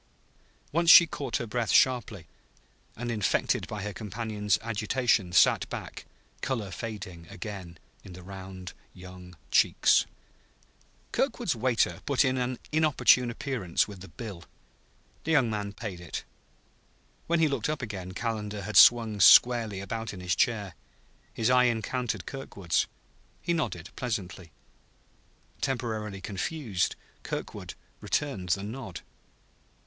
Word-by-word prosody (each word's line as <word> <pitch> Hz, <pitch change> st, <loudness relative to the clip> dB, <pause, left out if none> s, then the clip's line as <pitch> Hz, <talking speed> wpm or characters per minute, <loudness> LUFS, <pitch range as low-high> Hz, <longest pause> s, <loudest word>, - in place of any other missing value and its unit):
Once 170 Hz, +2 st, +2 dB
she 170 Hz, -, +11 dB
caught 140 Hz, -6 st, -3 dB
her 120 Hz, -, -4 dB
breath 115 Hz, 0 st, -2 dB
sharply, 120 Hz, -9 st, +2 dB, 0.7 s
and, 120 Hz, +1 st, -4 dB
infected 105 Hz, -4 st, 0 dB
by 105 Hz, -2 st, -5 dB
her 105 Hz, 0 st, -4 dB
companion's 105 Hz, 0 st, -1 dB
agitation, 110 Hz, -3 st, +1 dB
sat -, -, +4 dB
back, -, -, -7 dB, 0.4 s
color 110 Hz, -7 st, -2 dB
fading 95 Hz, -8 st, -7 dB
again 90 Hz, -3 st, -8 dB, 0.3 s
in 95 Hz, -, -11 dB
the 90 Hz, 0 st, -11 dB
round 95 Hz, -1 st, -9 dB, 0.2 s
young 90 Hz, -1 st, -12 dB
cheeks. -, -, +4 dB, 1.0 s
Kirkwood's -, -, 0 dB
waiter 120 Hz, 0 st, +1 dB
put 140 Hz, 0 st, +3 dB
in 130 Hz, 0 st, +1 dB
an 125 Hz, 0 st, -2 dB
inopportune 150 Hz, -5 st, +4 dB
appearance 115 Hz, -8 st, -1 dB
with 100 Hz, -3 st, -10 dB
the 95 Hz, -, -10 dB
bill. 100 Hz, -7 st, -8 dB, 0.8 s
The 160 Hz, -, 0 dB
young 130 Hz, -7 st, +3 dB
man 105 Hz, -1 st, -3 dB
paid 100 Hz, -4 st, -7 dB
it. 85 Hz, -5 st, -6 dB, 1.0 s
When 170 Hz, 0 st, +2 dB
he 160 Hz, -, +4 dB
looked 140 Hz, -3 st, -1 dB
up 155 Hz, -3 st, -2 dB
again 95 Hz, -5 st, -6 dB
Calendar 105 Hz, -2 st, -3 dB
had 110 Hz, +3 st, -1 dB
swung 115 Hz, -3 st, +7 dB
squarely 115 Hz, -2 st, +6 dB
about 110 Hz, +2 st, -5 dB
in -, -, -9 dB
his 90 Hz, -1 st, -1 dB
chair. 105 Hz, -7 st, 0 dB, 0.6 s
His 115 Hz, +2 st, 0 dB
eye 125 Hz, 0 st, +5 dB
encountered 120 Hz, +1 st, -1 dB
Kirkwood's. 100 Hz, -10 st, -2 dB, 0.5 s
He 170 Hz, -, -1 dB
nodded 110 Hz, -, -3 dB
pleasantly. 95 Hz, -8 st, -4 dB, 1.1 s
Temporarily 110 Hz, -6 st, -3 dB
confused, 105 Hz, -, -2 dB, 0.3 s
Kirkwood -, -, -6 dB, 0.2 s
returned 105 Hz, -11 st, -2 dB
the 95 Hz, +3 st, +1 dB
nod. 110 Hz, -4 st, -7 dB
110 Hz, 125 wpm, -28 LUFS, 95-125 Hz, 1.1 s, she